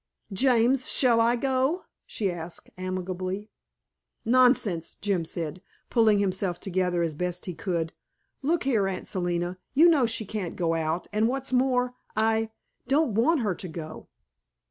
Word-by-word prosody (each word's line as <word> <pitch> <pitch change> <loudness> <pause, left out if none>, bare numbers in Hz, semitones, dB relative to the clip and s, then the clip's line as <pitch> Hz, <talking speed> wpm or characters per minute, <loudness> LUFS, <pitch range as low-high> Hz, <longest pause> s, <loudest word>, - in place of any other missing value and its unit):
"James, 255 +3 +3
shall 235 -3 +4
I 235 +1 +3
go?" 265 +7 0 0.2
she 200 -4 -1
asked 170 0 -7
amiably. 185 +2 -4 0.7
"Nonsense," 235 -8 +3
Jim 195 -5 -1
said, 165 +1 -4 0.3
pulling 220 -3 +4
himself 190 -2 -1
together 180 -2 0
as 165 -2 -1
best 180 +3 -3
he 180 - -4
could. 170 -2 -2 0.5
"Look 320 +4 +1
here, 225 -8 +2
Aunt 190 -1 -4
Selina, 175 0 -2 0.2
you 320 +5 +7
know 285 -7 +4
she 225 -1 -1
can't 200 -4 -4
go 165 -2 0
out, 165 +1 -1
and 215 +1 +3
what's 265 +1 -2
more, 250 -1 +2 0.2
I 220 0 +2 0.4
don't 275 -2 +2
want 265 +8 +3
her 205 -4 0
to 180 - -6
go." 160 -1 -8
205 Hz, 145 wpm, -27 LUFS, 180-250 Hz, 0.7 s, you